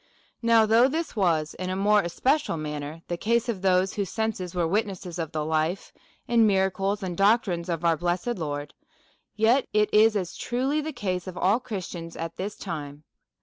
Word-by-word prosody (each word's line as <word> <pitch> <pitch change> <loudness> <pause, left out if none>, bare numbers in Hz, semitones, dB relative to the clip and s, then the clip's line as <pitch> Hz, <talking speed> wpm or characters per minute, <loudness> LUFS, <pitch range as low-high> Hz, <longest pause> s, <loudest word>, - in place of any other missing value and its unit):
Now, 230 -1 +5
though 225 +4 +5
this 315 +1 -3
was 165 -7 +1
in 185 0 -5
a 185 - -1
more 205 +2 +4
especial 255 - 0
manner 150 +1 -5
the 175 - -3
case 235 +6 +1
of 215 -6 -2
those 190 0 +2
whose 200 -3 -2
senses 215 -5 -3
were 175 -2 +1
witnesses 185 -2 -2
of 160 -2 -3
the 155 -1 -2
life, 160 +4 -1 0.3
and 230 -2 +4
miracles, 195 +1 +1
and 180 -2 -3
doctrines 195 -3 +2
of 170 0 -2
our 165 -1 +3
blessed 175 +6 -1
Lord; 145 -2 -4 0.6
yet 230 +5 +3
it 210 0 +2
is 210 -4 +3
truly 265 +5 -1
the 315 +1 -4
case 190 - -3
of 180 -1 -7
all 200 +6 +3
Christians 180 -8 -6
at 165 0 -5
this 200 +2 -4
time. 150 -5 -6
190 Hz, 180 wpm, -26 LUFS, 170-220 Hz, 0.6 s, Now